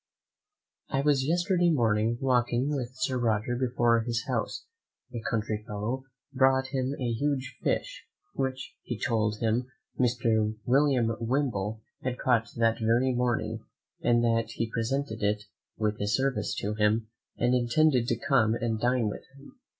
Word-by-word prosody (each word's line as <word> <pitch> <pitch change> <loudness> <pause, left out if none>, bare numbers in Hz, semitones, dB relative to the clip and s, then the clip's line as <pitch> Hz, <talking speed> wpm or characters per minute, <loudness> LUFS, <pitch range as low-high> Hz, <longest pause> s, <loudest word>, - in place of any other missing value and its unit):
I 135 - 0
was 140 -2 +2
yesterday 175 +1 +2
morning 115 -5 +2
walking 125 +2 +1
with 125 -3 -3
Sir 130 -1 -1
Roger 115 0 0
before 120 -2 +2
his 115 0 -2
house, - - -2 0.5
a 120 - -4
country 110 -1 -2
fellow 110 +6 -3 0.3
brought 130 0 +3
him 130 +1 -1
a 125 -2 -1
huge 135 +1 -1
fish, - - -2 0.3
which, 130 -1 -3
he 120 - -5
told 110 -3 0
him, 115 +2 +1 0.3
Mr. 115 -3 +2
William 130 -4 +3
Wimble 115 -4 -1 0.2
had 125 -1 -2
caught 115 -3 +2
that 115 -1 +2
very 120 +3 +2
morning; 120 -1 -1 0.4
and 120 0 +3
that 115 -1 +2
he 115 -1 -3
presented 115 0 -2
it, 105 0 0 0.3
with 105 0 -1
his 105 +1 +1
service 130 -6 -1
to 105 +1 -2
him, 110 +1 +1 0.3
and 120 +1 +2
intended 125 +1 +3
to 120 - +1
come 115 -6 +4
and 115 -2 -1
dine 125 -2 +2
with 105 - -4 0.2
him. 140 - -16
120 Hz, 150 wpm, -28 LUFS, 110-130 Hz, 0.5 s, come